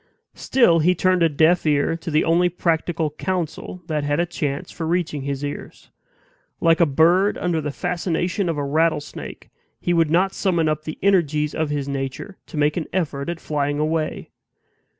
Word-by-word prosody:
Still 205 Hz, -11 st, +3 dB
he 180 Hz, +4 st, +3 dB
turned 185 Hz, +1 st, +2 dB
a 165 Hz, -, +5 dB
deaf 160 Hz, +4 st, +3 dB
ear 150 Hz, +1 st, +1 dB
to 165 Hz, -, -7 dB
the 155 Hz, 0 st, +2 dB
only 175 Hz, +2 st, +3 dB
practical 165 Hz, -2 st, -1 dB
counsel 180 Hz, +1 st, -4 dB
that 155 Hz, -3 st, -2 dB
had 145 Hz, +2 st, 0 dB
a 175 Hz, -, +2 dB
chance 145 Hz, -5 st, -4 dB
for 160 Hz, -, -5 dB
reaching 165 Hz, -4 st, -1 dB
his 140 Hz, +1 st, -3 dB
ears. 145 Hz, -, -8 dB, 0.7 s
Like 165 Hz, 0 st, +3 dB
a 170 Hz, -, +5 dB
bird 170 Hz, +8 st, +3 dB
under 170 Hz, -3 st, -1 dB
the 150 Hz, -, -3 dB
fascination 175 Hz, +3 st, -1 dB
of 165 Hz, -, -2 dB
a 145 Hz, -, -1 dB
rattlesnake, 155 Hz, +1 st, -2 dB, 0.3 s
he 175 Hz, -, 0 dB
would 165 Hz, -2 st, +3 dB
not 185 Hz, +4 st, +2 dB
summon 170 Hz, -5 st, +1 dB
up 155 Hz, 0 st, -1 dB
the 155 Hz, -, -5 dB
energies 155 Hz, -6 st, +2 dB
of 160 Hz, -1 st, -1 dB
his 145 Hz, -2 st, -2 dB
nature 140 Hz, +8 st, -5 dB
to -, -, -8 dB
make 150 Hz, +2 st, +2 dB
an 165 Hz, -, -2 dB
effort 150 Hz, -5 st, -2 dB
at 170 Hz, -1 st, -4 dB
flying 145 Hz, -2 st, -1 dB
away. 155 Hz, +1 st, -2 dB
160 Hz, 180 wpm, -22 LUFS, 150-175 Hz, 0.7 s, a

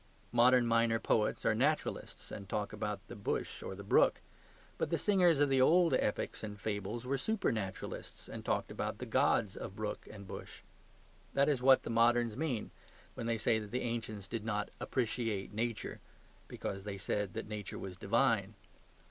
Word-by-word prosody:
Modern 120 Hz, +1 st, +6 dB
minor 115 Hz, 0 st, +3 dB
poets 110 Hz, -1 st, +1 dB
are -, -, +4 dB
naturalists, 140 Hz, +8 st, -1 dB
and 100 Hz, -1 st, -7 dB
talk 105 Hz, -1 st, -2 dB
about 105 Hz, -2 st, -4 dB
the 120 Hz, -, -8 dB
bush 100 Hz, -, -3 dB
or 95 Hz, -, -5 dB
the 100 Hz, -, -8 dB
brook; 100 Hz, -, +4 dB, 0.6 s
but -, -, 0 dB
the -, -, +1 dB
singers 180 Hz, -7 st, +4 dB
of 145 Hz, -, +5 dB
the 135 Hz, -1 st, +3 dB
old 170 Hz, +3 st, +5 dB
epics 110 Hz, -4 st, 0 dB
and 105 Hz, -1 st, -6 dB
fables 105 Hz, +3 st, -3 dB
were 135 Hz, +1 st, 0 dB
supernaturalists, 110 Hz, -, -3 dB
and -, -, -7 dB
talked -, -, -1 dB
about -, -, -3 dB
the -, -, -5 dB
gods 105 Hz, -4 st, +2 dB
of 95 Hz, -, -6 dB
brook 105 Hz, -1 st, -4 dB
and 100 Hz, -2 st, -10 dB
bush. -, -, -8 dB, 0.7 s
That 140 Hz, +1 st, +4 dB
is 140 Hz, -4 st, +2 dB
what 130 Hz, +1 st, +6 dB
the -, -, -4 dB
moderns 115 Hz, -1 st, +3 dB
mean 135 Hz, -6 st, -2 dB, 0.4 s
when 115 Hz, -, -4 dB
they 115 Hz, -1 st, +1 dB
say 110 Hz, +1 st, +2 dB
that 105 Hz, -1 st, -7 dB
the 125 Hz, +4 st, -2 dB
ancients 110 Hz, -4 st, -3 dB
did 115 Hz, 0 st, -4 dB
not 105 Hz, -2 st, -2 dB
"appreciate 115 Hz, -5 st, -1 dB
Nature," 115 Hz, 0 st, -2 dB, 0.5 s
because 95 Hz, 0 st, -5 dB
they 100 Hz, -1 st, -5 dB
said 100 Hz, 0 st, -2 dB
that -, -, -4 dB
Nature 105 Hz, -2 st, -5 dB
was 95 Hz, -2 st, -6 dB
divine. 110 Hz, 0 st, +1 dB
115 Hz, 175 wpm, -34 LUFS, 105-125 Hz, 0.7 s, Modern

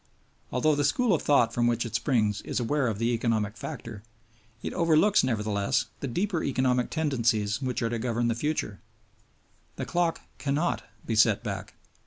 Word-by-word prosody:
Although 150 Hz, +5 st, +2 dB
the 145 Hz, 0 st, +1 dB
school 220 Hz, -, +2 dB
of 165 Hz, -, +1 dB
thought 120 Hz, -6 st, +3 dB
from 120 Hz, 0 st, +2 dB
which 120 Hz, 0 st, +1 dB
it 115 Hz, -, -6 dB
springs 110 Hz, -5 st, +1 dB
is -, -, -3 dB
aware 135 Hz, +3 st, +1 dB
of 110 Hz, -3 st, -1 dB
the 115 Hz, +2 st, +1 dB
economic 110 Hz, -2 st, 0 dB
factor, 105 Hz, -3 st, -7 dB, 0.6 s
it -, -, -3 dB
overlooks, 170 Hz, +5 st, +4 dB
nevertheless, 105 Hz, -5 st, 0 dB
the 140 Hz, -, -3 dB
deeper 175 Hz, -, -1 dB
economic 125 Hz, -2 st, +1 dB
tendencies 115 Hz, -8 st, 0 dB
which 125 Hz, -3 st, -2 dB
are 115 Hz, -, +1 dB
to 120 Hz, -, -2 dB
govern 120 Hz, 0 st, 0 dB
the 115 Hz, -, +2 dB
future. 120 Hz, -5 st, -2 dB, 1.0 s
The -, -, -4 dB
clock 175 Hz, -1 st, 0 dB, 0.2 s
cannot 145 Hz, +4 st, 0 dB, 0.2 s
be 115 Hz, -, -1 dB
set 110 Hz, -1 st, +4 dB
back. -, -, -5 dB
120 Hz, 170 wpm, -27 LUFS, 115-150 Hz, 1.0 s, overlooks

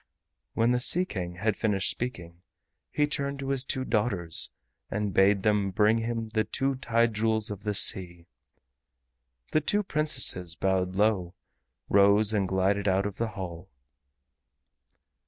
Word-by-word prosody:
When 115 Hz, +2 st, +2 dB
the 125 Hz, -, +1 dB
Sea 175 Hz, +8 st, +3 dB
King 90 Hz, -, -5 dB
had 105 Hz, +3 st, -1 dB
finished 100 Hz, -4 st, +1 dB
speaking 90 Hz, -9 st, -6 dB, 0.5 s
he 150 Hz, -, +1 dB
turned 140 Hz, -1 st, -3 dB
to 135 Hz, 0 st, -5 dB
his 135 Hz, -2 st, 0 dB
two 130 Hz, -1 st, -3 dB
daughters 105 Hz, -8 st, +1 dB, 0.4 s
and 105 Hz, -2 st, -2 dB
bade 95 Hz, +1 st, +3 dB
them 105 Hz, -2 st, +1 dB
bring 105 Hz, +4 st, +2 dB
him 115 Hz, -1 st, -3 dB
the 110 Hz, 0 st, 0 dB
two 135 Hz, +4 st, -2 dB
Tide 115 Hz, -3 st, 0 dB
Jewels 110 Hz, 0 st, 0 dB
of 100 Hz, -1 st, -7 dB
the 105 Hz, -1 st, -2 dB
Sea. 85 Hz, -3 st, +1 dB, 1.3 s
The 155 Hz, -, +2 dB
two 205 Hz, +7 st, 0 dB
Princesses 130 Hz, -, +1 dB
bowed 95 Hz, 0 st, -1 dB
low, 95 Hz, -4 st, 0 dB, 0.5 s
rose 100 Hz, +2 st, +4 dB
and 100 Hz, -3 st, +1 dB
glided 95 Hz, +2 st, 0 dB
out 95 Hz, +1 st, +2 dB
of 105 Hz, -1 st, -5 dB
the 115 Hz, -, -1 dB
hall. 90 Hz, -1 st, -7 dB
105 Hz, 145 wpm, -27 LUFS, 95-120 Hz, 1.3 s, rose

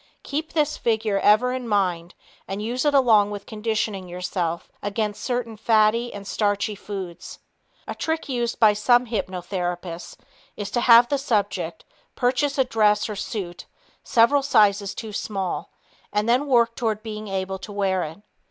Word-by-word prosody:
Keep 310 Hz, +3 st, -4 dB
this 300 Hz, -2 st, +1 dB
figure 220 Hz, -3 st, 0 dB
ever 230 Hz, +6 st, +4 dB
in 255 Hz, -2 st, -4 dB
mind 180 Hz, -5 st, 0 dB, 0.3 s
and 195 Hz, +1 st, -4 dB
use 240 Hz, +6 st, -2 dB
it 295 Hz, -, +3 dB
along 220 Hz, -6 st, +5 dB
with 205 Hz, -1 st, -6 dB
conditioning 215 Hz, -3 st, -2 dB
yourself 180 Hz, -1 st, -3 dB
against 205 Hz, 0 st, -2 dB
certain 245 Hz, -3 st, -2 dB
fatty 220 Hz, +2 st, +2 dB
and 200 Hz, -1 st, -8 dB
starchy 205 Hz, +1 st, 0 dB
foods. 190 Hz, -4 st, -7 dB, 0.5 s
A -, -, -3 dB
trick 320 Hz, 0 st, -2 dB
used 240 Hz, -3 st, -2 dB
by 215 Hz, -2 st, +6 dB
some 240 Hz, +4 st, +3 dB
hypnotherapists 180 Hz, -4 st, -4 dB, 0.4 s
is 205 Hz, -1 st, -5 dB
to 240 Hz, -, 0 dB
have 235 Hz, 0 st, +7 dB
the 285 Hz, -, +1 dB
subject 215 Hz, -7 st, -1 dB, 0.3 s
purchase 270 Hz, +3 st, +1 dB
a 265 Hz, -, +5 dB
dress 210 Hz, -4 st, +2 dB
or 210 Hz, -, -4 dB
suit 195 Hz, -4 st, -5 dB, 0.4 s
several 245 Hz, +5 st, +4 dB
sizes 205 Hz, -6 st, +3 dB
too 220 Hz, -2 st, -7 dB
small 195 Hz, -3 st, -3 dB, 0.4 s
and 210 Hz, +1 st, 0 dB
then 250 Hz, +5 st, +2 dB
work 235 Hz, -3 st, +3 dB
toward 220 Hz, -3 st, -2 dB
being 215 Hz, -1 st, -6 dB
able 190 Hz, 0 st, -3 dB
to 205 Hz, -, -9 dB
wear 195 Hz, -2 st, 0 dB
it. 160 Hz, +4 st, -6 dB
215 Hz, 155 wpm, -24 LUFS, 195-240 Hz, 0.5 s, have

